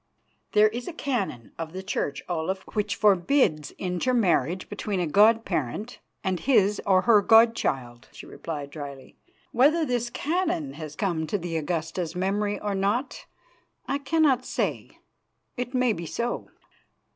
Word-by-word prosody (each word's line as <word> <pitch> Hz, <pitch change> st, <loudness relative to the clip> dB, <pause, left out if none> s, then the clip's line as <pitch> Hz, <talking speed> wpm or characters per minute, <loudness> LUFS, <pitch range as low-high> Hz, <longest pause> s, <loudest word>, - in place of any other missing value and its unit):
"There 215 Hz, 0 st, +6 dB
is 240 Hz, +3 st, -6 dB
a 355 Hz, -, -5 dB
canon 210 Hz, -, -3 dB
of 160 Hz, 0 st, -5 dB
the 190 Hz, +1 st, -6 dB
Church, 145 Hz, -7 st, -3 dB
Olaf, 180 Hz, +2 st, -2 dB
which 210 Hz, -1 st, -1 dB
forbids 190 Hz, -, +3 dB
intermarriage 185 Hz, -, +1 dB
between 205 Hz, -1 st, -3 dB
a 175 Hz, -, +1 dB
god 220 Hz, +7 st, +4 dB
parent 175 Hz, -, -3 dB, 0.2 s
and 185 Hz, -2 st, -1 dB
his 210 Hz, -2 st, +3 dB
or 185 Hz, -1 st, +4 dB
her 220 Hz, -3 st, +6 dB
god 225 Hz, +3 st, +6 dB
child," 120 Hz, -, -3 dB
she -, -, -11 dB
replied 145 Hz, -3 st, -6 dB
dryly. 140 Hz, -3 st, -9 dB, 0.3 s
"Whether 305 Hz, +7 st, +4 dB
this 245 Hz, -3 st, -1 dB
canon 325 Hz, 0 st, -1 dB
has 155 Hz, -2 st, -8 dB
come 165 Hz, -4 st, -1 dB
to 205 Hz, -, 0 dB
the 170 Hz, -2 st, -5 dB
Augusta's 165 Hz, +2 st, -2 dB
memory 205 Hz, +3 st, -1 dB
or 205 Hz, -1 st, -2 dB
not, 200 Hz, +7 st, -1 dB, 0.6 s
I 280 Hz, -, -1 dB
cannot 280 Hz, -3 st, +2 dB
say. -, -, -3 dB, 0.6 s
It 250 Hz, +1 st, -4 dB
may 250 Hz, -2 st, +3 dB
be 170 Hz, -3 st, -6 dB
so." 235 Hz, +8 st, -3 dB
200 Hz, 145 wpm, -26 LUFS, 165-240 Hz, 0.6 s, There